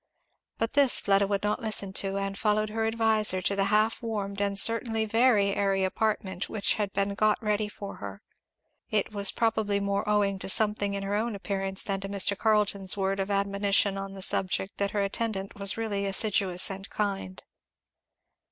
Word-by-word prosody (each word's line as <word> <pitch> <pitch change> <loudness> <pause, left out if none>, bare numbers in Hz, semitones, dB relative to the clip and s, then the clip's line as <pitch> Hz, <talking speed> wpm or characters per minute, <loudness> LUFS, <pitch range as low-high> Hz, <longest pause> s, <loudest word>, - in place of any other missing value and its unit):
But 225 +1 -1
this 280 -3 +4
Fleda 195 0 +2
would 200 0 -1
not 210 0 -1
listen 205 -3 0
to, 195 0 0
and 195 0 -3
followed 215 +1 0
her 220 0 -1
adviser 220 -3 +2
to 200 - +1
the 195 0 +1
half 215 +2 +1
warmed 205 -3 -4
and 200 -1 0
certainly 225 +1 +2
very 220 -3 +3
airy 195 -1 +1
apartment 190 -1 -2
which 205 -3 0
had 205 -2 -2
been 200 0 -1
got 215 +1 +2
ready 210 -1 -1
for 200 -1 -8
her. 100 -1 -9 0.7
It 215 -1 0
was 200 -1 +2
probably 220 -3 0
more 200 +1 -2
owing 200 -2 +1
to - - -4
something 205 -1 +2
in 200 - -4
her 195 +1 -3
own 220 +1 -1
appearance 195 -1 -3
than 195 -1 -2
to 195 - -6
Mr. 200 0 +2
Carleton's 205 -3 +1
word 195 0 -1
of 195 +1 -2
admonition 200 0 +1
on 195 0 -6
the 190 - -4
subject 190 +1 +1
that 200 0 0
her 205 0 -1
attendant 200 -1 -3
was 200 0 0
really 205 -3 -2
assiduous 195 -2 +1
and 195 +1 -7
kind. 195 - -3
200 Hz, 180 wpm, -27 LUFS, 195-215 Hz, 0.7 s, this